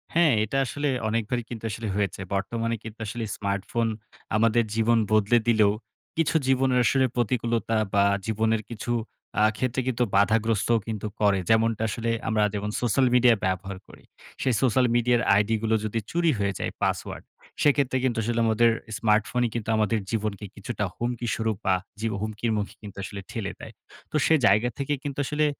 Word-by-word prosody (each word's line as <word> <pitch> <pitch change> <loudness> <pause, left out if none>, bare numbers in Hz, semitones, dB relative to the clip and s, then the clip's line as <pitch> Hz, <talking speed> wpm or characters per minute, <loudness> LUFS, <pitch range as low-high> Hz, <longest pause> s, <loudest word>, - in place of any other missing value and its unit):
হ্যাঁ 165 -5 +5
এটা 110 +6 -2
আসলে 145 +3 -2 0.2
অনেকবারই 115 +2 -1
কিন্তু 115 -2 -7
আসলে 110 +1 -4
হয়েছে। 100 -3 -1
বর্তমানে 115 +4 -1
কিন্তু 110 0 -9
আসলে 115 +2 -4
স্মার্টফোন 100 +3 -1 0.5
আমাদের 115 +1 +3
জীবন 115 +1 +3
বদলে 110 +2 +4
দিলেও, 110 -3 +4 0.5
কিছু 165 0 +1
জীবনের 130 -1 +3
আসলে 135 -1 +3
প্রতিকূলতা 115 -2 0 0.2
বা 100 -1 +4 0.2
জীবনের 110 0 +1
কিছু 115 +1 -5 0.5
আ - - +5
ক্ষেত্রে 130 0 -1
কিন্তু 125 -1 +1
বাধাগ্রস্তও 110 +2 +3
কিন্তু 110 -1 -3
করে। 100 -2 +4
যেমনটা 110 0 +3
আসলে 115 +2 -2 0.2
আমরা 110 -1 +2
যেমন 105 0 -2
সোশ্যাল 125 +2 +2
মিডিয়া 125 -1 +6
ব্যবহার 95 +1 -2
করি, - - -16 0.4
সে 130 - +1
সোশ্যাল 130 0 +3
মিডিয়ার 120 0 +3
আইডিগুলো 110 +2 +1
যদি 115 +2 -1
চুরি 170 -1 +2
হয়ে 100 -1 0
যায়, - - -2
পাসওয়ার্ড। - - -2 0.4
সেক্ষেত্রে 140 -3 +3
কিন্তু 125 -3 0
আসলে 120 +1 -1
আমাদের 115 +1 +4 0.3
স্মার্টফোনই 115 +2 +1
কিন্তু 115 -1 -3
আমাদের 110 0 +1
জীবনকে 105 -2 -2
কিছুটা 105 +1 -4
হুমকি 120 0 -3
স্বরূপ 110 -2 -1
বা 95 - +4 0.2
জীব 115 -1 -1
হুমকির 110 +2 -2
মুখ 105 -1 -1
কিন্তু 100 -3 -10
আসলে 100 +1 -6
ঠেলে 105 -4 -3
দেয়। - - -10 0.4
তো - - -6
সে 160 - +5
জায়গা 105 +5 +4
থেকে 140 +1 -1
কিন্তু 145 -1 -4
আসলে 150 +2 +1
115 Hz, 165 wpm, -26 LUFS, 105-120 Hz, 0.5 s, মিডিয়া